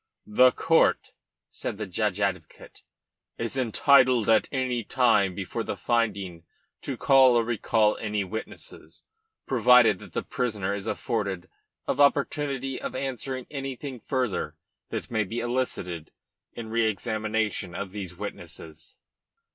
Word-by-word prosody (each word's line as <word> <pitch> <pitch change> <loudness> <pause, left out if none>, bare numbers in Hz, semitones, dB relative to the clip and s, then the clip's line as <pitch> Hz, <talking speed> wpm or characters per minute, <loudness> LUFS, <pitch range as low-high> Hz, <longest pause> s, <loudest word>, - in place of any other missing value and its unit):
"The 125 +4 +5
court," 160 +4 +2 0.4
said - - -4
the 110 - -3
judge 100 +1 -1
advocate, 95 -5 -4 0.6
"is 115 +2 -4
entitled 130 -1 +4
at 110 - +3
any 130 -3 -1
time 110 -6 +2
before 100 +4 -4
the - - -4
finding 100 -8 -1 0.4
to - - -4
call 130 -2 +6
or 120 - +4
recall 115 -2 +1
any 105 -2 -1
witnesses, 110 +4 -8 0.4
provided 120 -5 +5
that - - -13
the - - -2
prisoner 105 -6 -2
is 100 +1 -5
afforded 100 -5 -2 0.4
an - - -1
opportunity 140 -2 +1
of - - -5
answering 130 -1 -4
anything 135 -2 -5
further 125 -3 -2 0.3
that - - -5
may 110 -2 +1
be 115 +5 -4
elicited 120 -10 -2 0.4
in 110 -2 -7
re 115 -1 +2
examination 110 -3 -2
of 100 -1 -5
these 95 -3 -6
witnesses." 85 -5 -8
110 Hz, 130 wpm, -26 LUFS, 100-125 Hz, 0.6 s, call